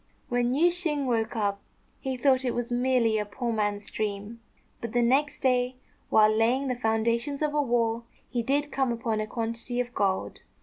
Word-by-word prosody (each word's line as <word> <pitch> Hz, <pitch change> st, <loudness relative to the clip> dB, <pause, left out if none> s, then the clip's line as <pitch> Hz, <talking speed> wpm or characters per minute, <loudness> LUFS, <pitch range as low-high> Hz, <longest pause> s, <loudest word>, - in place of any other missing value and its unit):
When 245 Hz, +1 st, +1 dB
Yüeh 335 Hz, +5 st, +5 dB
shêng 325 Hz, -5 st, +1 dB
woke 230 Hz, -3 st, 0 dB
up, 200 Hz, -2 st, -1 dB, 0.4 s
he 265 Hz, -2 st, -3 dB
thought 260 Hz, 0 st, +3 dB
it 250 Hz, -, -1 dB
was 240 Hz, 0 st, -3 dB
merely 240 Hz, -3 st, +2 dB
a -, -, 0 dB
poor 235 Hz, +3 st, -3 dB
man's 205 Hz, -1 st, -2 dB
dream; 210 Hz, +2 st, -4 dB, 0.4 s
but 230 Hz, -1 st, -5 dB
the 240 Hz, -1 st, +3 dB
next 275 Hz, +5 st, +2 dB
day, 250 Hz, -1 st, +2 dB, 0.3 s
while 215 Hz, 0 st, +5 dB
laying 250 Hz, +5 st, +2 dB
the 250 Hz, -, 0 dB
foundations 235 Hz, +5 st, 0 dB
of 300 Hz, -1 st, 0 dB
a 295 Hz, -, +2 dB
wall, 235 Hz, -3 st, 0 dB, 0.2 s
he 240 Hz, -1 st, -2 dB
did 285 Hz, +4 st, 0 dB
come 265 Hz, -2 st, +1 dB
upon 230 Hz, -2 st, -1 dB
a 215 Hz, -, -2 dB
quantity 230 Hz, +2 st, -3 dB
of 245 Hz, 0 st, -2 dB
gold. 195 Hz, -4 st, -1 dB
240 Hz, 185 wpm, -27 LUFS, 225-260 Hz, 0.4 s, Yüeh